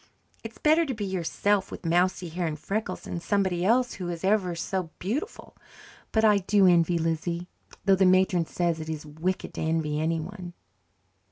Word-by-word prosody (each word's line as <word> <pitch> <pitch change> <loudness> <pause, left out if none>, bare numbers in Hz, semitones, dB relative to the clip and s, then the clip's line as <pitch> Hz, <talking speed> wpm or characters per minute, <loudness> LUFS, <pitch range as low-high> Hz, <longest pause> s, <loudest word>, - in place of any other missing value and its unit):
It's 225 0 -8
better 315 +2 +4
to 265 - -2
be 210 -2 -3
yourself 190 +2 0
with - - -9
mousy 175 +1 +1
hair 170 +1 -2
and 155 -1 -3
freckles 195 +3 -3
than 170 - -5
somebody 190 -1 0
else 245 +5 +2
who 180 -2 -5
is 170 -1 -5
ever 190 -3 +1
so 180 0 -3
beautiful. 280 - -4 0.6
But 220 0 +3
I 210 -2 +5
do 200 +1 +3
envy 175 -1 +4
Lizzie, 165 +2 -2 0.4
though 195 - +5
the 190 0 +4
matron 185 -2 +3
says 170 -2 -1
it 160 0 -6
is 155 -1 -5
wicked 160 +5 -3
to - - -5
envy 160 -2 0
anyone." 175 +3 -3
180 Hz, 175 wpm, -27 LUFS, 165-200 Hz, 0.6 s, I